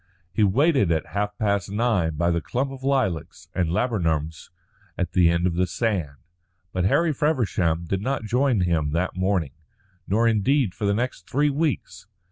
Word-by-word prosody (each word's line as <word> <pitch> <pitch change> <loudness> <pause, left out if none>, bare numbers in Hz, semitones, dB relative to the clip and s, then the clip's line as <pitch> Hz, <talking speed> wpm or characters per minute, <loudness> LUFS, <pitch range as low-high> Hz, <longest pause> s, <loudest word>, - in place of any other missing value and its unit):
He 105 - +2
waited 130 - +3
at 80 -2 0
half 105 +1 -2
past 100 -3 0
nine 100 -7 0
by 85 +3 +1
the 85 0 0
clump 135 - -2
of 130 -1 -10
lilacs 95 - -1
and 90 -4 0
laburnums 80 - -1 0.5
at 90 - -2
the 90 -3 +4
end 85 +1 +1
of 90 - +1
the 90 +2 +1
sand, 90 -8 -2 0.6
but 90 -1 0
Harry 160 - +3
Feversham 100 - 0
did 95 +3 -2
not 130 +1 -2
join 125 0 +1
him 80 -4 0
that 90 +2 -1
morning, 95 -6 0 0.5
nor 115 +4 +2
indeed 115 0 +2
for 105 - -4
the 100 - +2
next 120 -6 -3
three 145 +2 +2
weeks. 135 - -2
100 Hz, 170 wpm, -24 LUFS, 85-125 Hz, 0.6 s, the